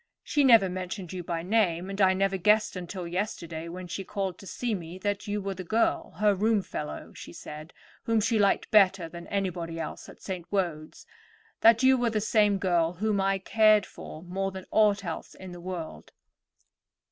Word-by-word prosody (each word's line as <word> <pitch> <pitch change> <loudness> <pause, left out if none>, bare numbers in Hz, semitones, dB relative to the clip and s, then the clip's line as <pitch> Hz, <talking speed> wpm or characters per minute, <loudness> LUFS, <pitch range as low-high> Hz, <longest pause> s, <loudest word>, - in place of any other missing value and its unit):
She 290 - +1
never 230 -7 +7
mentioned 185 0 -5
you 180 -1 -5
by 165 -1 -3
name, 185 -3 +1
and 195 +1 -3
I 190 -1 +5
never 195 0 +1
guessed 210 +3 +3
until 180 0 -6
yesterday, 170 -3 -4
when 180 +1 -7
she 195 - -5
called 195 -2 -4
to 195 - -11
see 240 +3 -2
me, 175 -2 -6
that 205 +2 -3
you 205 0 -1
were 195 -1 -3
the 185 0 -7
girl, 220 +6 0
her 210 +1 +4
roomfellow, 200 -6 -2
she - - -10
said, 155 +2 -9 0.3
whom 225 -1 +2
she 225 +1 +1
liked 200 -1 +2
better 195 -4 +5
than 170 +1 -10
anybody 175 -4 -3
else - - -6
at - - -14
St. 185 -3 -6
Wode's—that 195 +6 -1
you 260 0 +6
were 240 -1 +2
the 220 -1 0
same 210 -1 +3
girl 175 -3 +1
whom 205 +2 0
I 195 0 +2
cared 215 +1 +4
for 155 - -10
more 190 +2 -2
than 190 -1 -8
aught 205 -2 +3
else 165 - -6
in 190 -1 -10
the 175 -1 -9
world." 175 -3 -7
190 Hz, 185 wpm, -28 LUFS, 175-210 Hz, 0.3 s, never